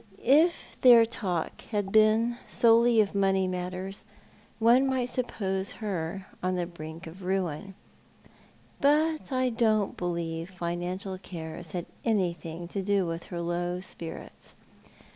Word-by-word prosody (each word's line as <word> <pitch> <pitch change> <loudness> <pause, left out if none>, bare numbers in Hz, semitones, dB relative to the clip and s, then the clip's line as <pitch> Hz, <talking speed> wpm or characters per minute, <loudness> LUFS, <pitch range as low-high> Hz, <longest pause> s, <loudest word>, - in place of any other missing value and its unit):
If 310 +7 +3
their 240 -3 +8
talk 185 -7 -3
had 205 -3 -1
been 220 +2 +4
solely 230 0 +5
of 205 - -1
money 195 -1 +2
matters, 185 +2 -4 0.5
one 240 +4 +5
might 255 -2 0
suppose 195 -6 -2
her 190 -3 -4 0.2
on 185 0 0
the 175 -1 -1
brink 165 0 -9
of 170 +4 -10
ruin, 190 0 -2 1.0
but 305 +2 +2
I 255 -1 +1
don't 220 -3 +1
believe 170 -1 -3
financial 180 +2 -4
cares 165 -2 -7
had 175 -2 -3 0.2
anything 175 -6 -1
to 195 - -3
do 200 -1 +1
with 165 0 -4
her 175 -2 -5
low 175 +1 -2
spirits. 170 -3 -9
190 Hz, 125 wpm, -28 LUFS, 175-225 Hz, 1.0 s, their